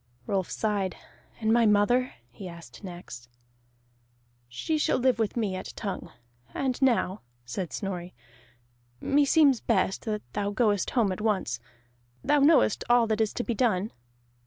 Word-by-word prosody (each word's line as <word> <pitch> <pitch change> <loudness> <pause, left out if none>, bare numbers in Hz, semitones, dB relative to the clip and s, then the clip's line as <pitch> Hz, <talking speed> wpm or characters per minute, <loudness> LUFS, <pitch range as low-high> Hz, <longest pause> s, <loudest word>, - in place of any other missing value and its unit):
Rolf 190 +2 -1
sighed. 205 -4 -1 0.4
"And 220 -1 +2
my 235 -1 +4
mother?" 240 +5 +3 0.2
he 185 +10 -9
asked 170 +3 -12
next. 175 -10 -9 1.2
"She 310 - -2
shall - - +2
live 255 -2 +2
with 220 +1 -1
me 205 -5 0
at 185 - -6
Tongue. 195 -5 -5 0.4
And 260 -1 -1
now," 230 -6 +2 0.2
said 165 +8 -4
Snorri, 180 -3 -5 0.8
"meseems 285 -2 +4
best 195 -4 0
that 210 -2 -2
thou 205 -1 -1
goest 205 -2 +1
home 215 -5 +3
at 185 - -4
once. 200 - 0 0.6
Thou 295 - +3
knowest 285 -6 +4
all 240 -1 +5
that 220 0 0
is 220 - +1
to 245 - -2
be 235 - -2
done?" 215 -4 +1
210 Hz, 145 wpm, -27 LUFS, 190-240 Hz, 1.2 s, all